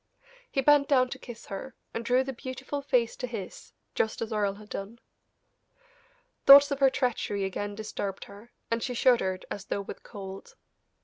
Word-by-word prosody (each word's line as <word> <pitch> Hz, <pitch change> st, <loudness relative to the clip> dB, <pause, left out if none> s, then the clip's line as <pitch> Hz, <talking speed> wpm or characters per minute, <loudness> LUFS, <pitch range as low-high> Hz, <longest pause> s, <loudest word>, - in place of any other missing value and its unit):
He 270 Hz, -, 0 dB
bent 290 Hz, +1 st, +5 dB
down 255 Hz, -3 st, +4 dB
to -, -, -7 dB
kiss 240 Hz, -2 st, -10 dB
her, 215 Hz, +6 st, -7 dB, 0.2 s
and 230 Hz, -, -3 dB
drew 250 Hz, +2 st, +3 dB
the 270 Hz, 0 st, -5 dB
beautiful 260 Hz, +3 st, -5 dB
face 250 Hz, -4 st, +1 dB
to 250 Hz, -, -4 dB
his, 215 Hz, -6 st, -7 dB, 0.2 s
just 220 Hz, -, 0 dB
as 225 Hz, -1 st, -3 dB
Earle 205 Hz, -2 st, 0 dB
had 210 Hz, +1 st, -14 dB
done. 200 Hz, +4 st, -6 dB, 1.5 s
Thoughts 280 Hz, +1 st, +10 dB
of 280 Hz, -, -1 dB
her 270 Hz, -1 st, +6 dB
treachery 235 Hz, -6 st, -1 dB
again 205 Hz, +2 st, -3 dB
disturbed 205 Hz, -2 st, -4 dB
her, 205 Hz, +4 st, -14 dB, 0.2 s
and 230 Hz, 0 st, +1 dB
she 250 Hz, 0 st, -3 dB
shuddered 190 Hz, -7 st, +2 dB
as 200 Hz, -, -5 dB
though 200 Hz, -, -2 dB
with 200 Hz, -, -9 dB
cold. 195 Hz, -1 st, -9 dB
230 Hz, 175 wpm, -28 LUFS, 200-260 Hz, 1.5 s, Thoughts